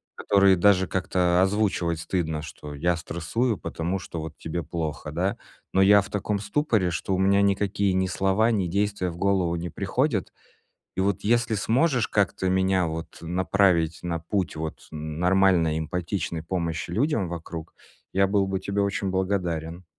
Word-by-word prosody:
который 100 Hz, -1 st, +4 dB
даже 95 Hz, 0 st, +4 dB
как-то 90 Hz, -1 st, +1 dB
озвучивать 95 Hz, -4 st, +1 dB
стыдно, 80 Hz, -5 st, -2 dB
что 75 Hz, -1 st, -9 dB
я 85 Hz, +4 st, +1 dB
стрессую, 100 Hz, +8 st, -1 dB
потому 85 Hz, +4 st, -3 dB
что 85 Hz, -2 st, -7 dB
вот 80 Hz, 0 st, -8 dB
тебе 85 Hz, +1 st, -4 dB
плохо, 80 Hz, -1 st, -4 dB
да. 95 Hz, +5 st, -1 dB, 0.4 s
Но 95 Hz, -, +4 dB
я 100 Hz, +1 st, +7 dB
в -, -, -9 dB
таком 105 Hz, 0 st, -2 dB
ступоре, 105 Hz, -2 st, +1 dB
что 95 Hz, +2 st, -1 dB
у -, -, -2 dB
меня 100 Hz, +1 st, +4 dB
никакие 100 Hz, 0 st, +1 dB
ни 95 Hz, 0 st, +1 dB
слова, 95 Hz, +5 st, +2 dB
ни 95 Hz, -5 st, 0 dB
действия 100 Hz, 0 st, 0 dB
в 85 Hz, -, -10 dB
голову 95 Hz, -3 st, +1 dB
не 85 Hz, +1 st, -4 dB
приходят. 105 Hz, -, -1 dB, 0.6 s
И -, -, 0 dB
вот 95 Hz, -1 st, 0 dB
если 115 Hz, 0 st, +2 dB
сможешь 125 Hz, +4 st, +2 dB
как-то 95 Hz, -2 st, +1 dB
меня 95 Hz, -1 st, +2 dB
вот 80 Hz, +1 st, -6 dB
направить 90 Hz, -1 st, +2 dB
на 85 Hz, -1 st, -2 dB
путь 95 Hz, 0 st, -2 dB
вот 80 Hz, 0 st, -6 dB
н 80 Hz, 0 st, -5 dB
нормальной 90 Hz, -4 st, +3 dB
эмпатичной 85 Hz, +1 st, -3 dB
помощи 85 Hz, -1 st, -3 dB
людям 115 Hz, -, +1 dB
вокруг, 85 Hz, -1 st, -7 dB, 0.4 s
я 95 Hz, +1 st, +3 dB
был 100 Hz, 0 st, +2 dB
бы 95 Hz, -, -1 dB
тебе 100 Hz, +1 st, -1 dB
очень 100 Hz, -1 st, -1 dB
благодарен. 90 Hz, -3 st, -2 dB
95 Hz, 160 wpm, -25 LUFS, 85-100 Hz, 0.6 s, я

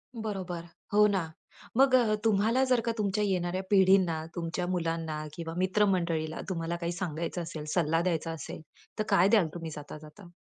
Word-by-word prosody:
बरोबर. 190 Hz, -6 st, -4 dB, 0.3 s
हो 210 Hz, 0 st, +6 dB
ना. 185 Hz, -6 st, -1 dB, 0.5 s
मग 265 Hz, 0 st, +6 dB
अ, 230 Hz, -4 st, +4 dB
तुम्हाला 225 Hz, +4 st, +3 dB
जर 255 Hz, -2 st, +3 dB
का 230 Hz, -, +1 dB
तुमच्या 210 Hz, 0 st, 0 dB
येणाऱ्या 185 Hz, -1 st, 0 dB
पिढींना, 190 Hz, -5 st, +4 dB
तुमच्या 175 Hz, +1 st, -3 dB
मुलांना 165 Hz, -3 st, -2 dB
किंवा 165 Hz, 0 st, -6 dB
मित्र-मंडळींना 180 Hz, -4 st, +1 dB
तुम्हाला 165 Hz, -1 st, -2 dB
काही 170 Hz, 0 st, -1 dB
सांगायचं 170 Hz, 0 st, -3 dB
असेल, 160 Hz, -2 st, -6 dB
सल्ला 165 Hz, -1 st, +2 dB
द्यायचा 165 Hz, -2 st, -1 dB
असेल, 160 Hz, -1 st, -7 dB, 0.4 s
तर -, -, +2 dB
काय 195 Hz, -2 st, +5 dB
द्याल 205 Hz, -7 st, +4 dB
तुम्ही 165 Hz, -2 st, -5 dB
जाता-जाता? 155 Hz, +5 st, -11 dB
175 Hz, 155 wpm, -29 LUFS, 165-200 Hz, 0.5 s, हो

